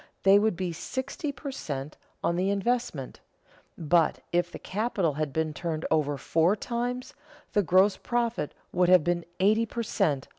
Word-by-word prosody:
they 195 +1 +7
would 215 -2 +1
be 180 -1 -3
sixty 260 - -4
per 280 0 -7
cent. 145 - -5 0.3
on 170 - +1
the 185 +2 +1
investment; 200 - -1 0.6
but, 165 0 +2
if 175 0 +1
the - - -7
capital 195 -6 -1
had 150 0 -2
been 160 +1 -1
turned 160 0 -3
over 145 -2 +2
four 165 +7 +2
times, 245 +3 -3 0.4
the 205 - +4
gross 190 +2 +4
profit 235 -9 -1 0.2
would 180 0 +2
have 180 -3 +7
been 175 +1 0 0.2
eighty 215 +4 +3
per 235 +2 -3
cent. 145 -10 0
180 Hz, 160 wpm, -28 LUFS, 160-220 Hz, 0.6 s, they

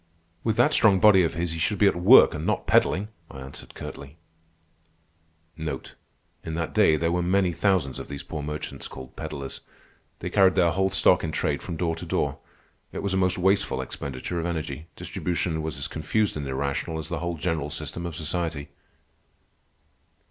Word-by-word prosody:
"With 110 -2 +1
that - - +4
strong 100 -3 +5
body 100 -1 +7
of 85 - 0
his 85 0 -1
he 85 - -4
should 105 +6 +1
be 105 - +4
at 100 - +4
work, 95 +9 +7
and 75 - -4
not - - -1
peddling," 100 +4 +2 0.2
I 65 - -10
answered 65 +1 -11
curtly. 70 +3 -9 1.4
In 80 -4 -3 0.8
that 80 -1 -3
day 80 - +5
there 85 +2 0
were 90 +1 +1
many 90 0 +2
thousands 85 -5 +1
of - - -7
these 70 -1 -6
poor 75 - -5
merchants 75 +1 -5
called 65 -1 -10
pedlers. 75 -4 -6 0.6
They - - -5
carried 95 -2 +5
their 85 -3 +4
whole 95 +2 +1
stock 90 -1 +4
in 80 - -2
trade - - -1
from 85 - -5
door 80 -1 0
to 85 - -7
door. - - -1 0.5
It - - -5
was 100 -1 -1
a - - +1
most 90 -1 +2
wasteful 95 +2 +1
expenditure 70 +6 -4
of 85 - -2
energy. 80 -1 -4
Distribution 85 -2 -2
was 80 -2 -4
as 70 +3 -2
confused 105 +6 0
and 75 -2 -4
irrational 70 +4 -2
as 80 - -5
the - - -2
whole 85 0 -3
general 80 -2 -2
system 85 +3 -5
of 85 - -6
society. 80 -3 -3
85 Hz, 185 wpm, -26 LUFS, 75-90 Hz, 1.4 s, body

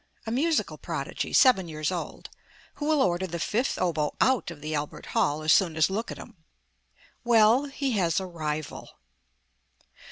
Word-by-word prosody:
A 225 - -4
musical 310 +7 0
prodigy, - - -4
seven 235 -9 +5
years 155 -1 -3
old, 175 -2 -6 0.5
who 295 - -3
will 310 -3 +3
order 180 +1 0
the 170 -1 -5
fifth 230 - -1
oboe 160 -5 -1
out 260 -7 +2
of 170 -3 -9
the 155 +1 -5
Albert 150 -1 -4
Hall 150 +2 +1
as 155 - +5
soon 170 -5 +2
as 160 +4 +3
look 220 +4 -3
at - - -6
him. - - -12 0.9
Well, 235 +3 +4
he 275 -1 -3
has 185 -5 +1
a 190 - -5
rival. 155 -4 -5
185 Hz, 165 wpm, -27 LUFS, 155-240 Hz, 0.9 s, seven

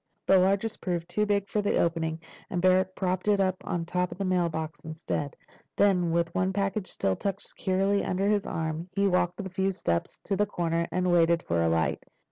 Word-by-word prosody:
The 190 - +6
largest 195 +4 +1
proved 170 -2 -2
too 210 +4 0
big 200 -1 +1
for 210 - 0
the 205 - +1
opening, 165 -1 0 0.3
and 180 - -2
Barrack 185 +1 +3
propped 185 0 -1
it 205 -1 +4
on 185 -3 -1
top 180 +1 -1
of - - -7
the 195 - -2
mailbox 165 -4 -1
instead. 155 -2 -4 0.4
Then, 185 -4 +3
with 170 0 0
one 185 +1 0
package 195 0 -1
still 95 - -1
tucked 195 - -3
securely 195 +1 0
under 190 +2 0
his 205 -1 +1
arm, 160 +2 -3
he 200 0 +3
walked 180 -2 +1
the 200 - -4
few 190 +1 0
steps 85 - -2
to 200 - -1
the 205 +2 +1
corner, 170 -3 -1
and 180 0 +1
waited 170 -1 +3
for 85 0 0
a 85 - +2
light. 80 -3 +1
180 Hz, 200 wpm, -28 LUFS, 165-195 Hz, 0.4 s, The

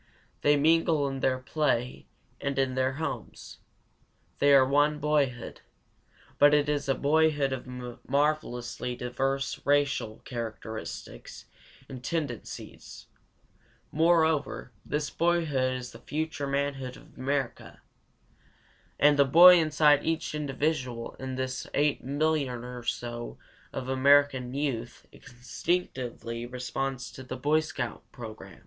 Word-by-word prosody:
They 145 0 +4
mingle 160 -1 +3
in 135 -1 -4
their 130 0 +1
play 130 -2 -1 0.3
and 140 -1 -3
in 135 -1 +1
their 130 0 0
homes. 160 +4 -6 0.8
They 145 - +5
are 135 -2 +7
one 145 +2 +3
boyhood. 145 -5 -1 0.8
But 145 +1 +7
it 145 0 +2
is 145 -1 -1
a 135 - +3
boyhood 145 -2 +2
of 130 -1 -6 0.4
marvelously 135 -4 -1
diverse 135 +3 -2
racial 140 -6 +1
characteristics 110 - -7 0.4
and 130 -2 -9
tendencies. 145 -7 -6 0.8
Moreover, 160 -4 +2
this 150 0 -2
boyhood 160 -7 +1
is 125 -1 -6
the 115 - -12
future 150 +1 -3
manhood 140 -2 -2
of - - -18
America. 135 -1 -3 1.2
And 145 0 +5
the 140 - +7
boy 175 +6 +9
inside 150 -2 +4
each 165 -1 -1
individual 140 -4 -2
in 130 0 -4
this 130 0 -3
8,000,000 145 -2 0
or 125 0 -7
so 120 0 -4 0.3
of 130 - -5
American 130 -1 +3
youth 125 -5 -3
instinctively 125 -3 -4
responds 125 +1 -4
to - - -10
the 130 0 -6
Boy 150 +4 +2
Scout 130 -7 -4
program. 110 - -10
135 Hz, 115 wpm, -28 LUFS, 125-150 Hz, 1.2 s, boy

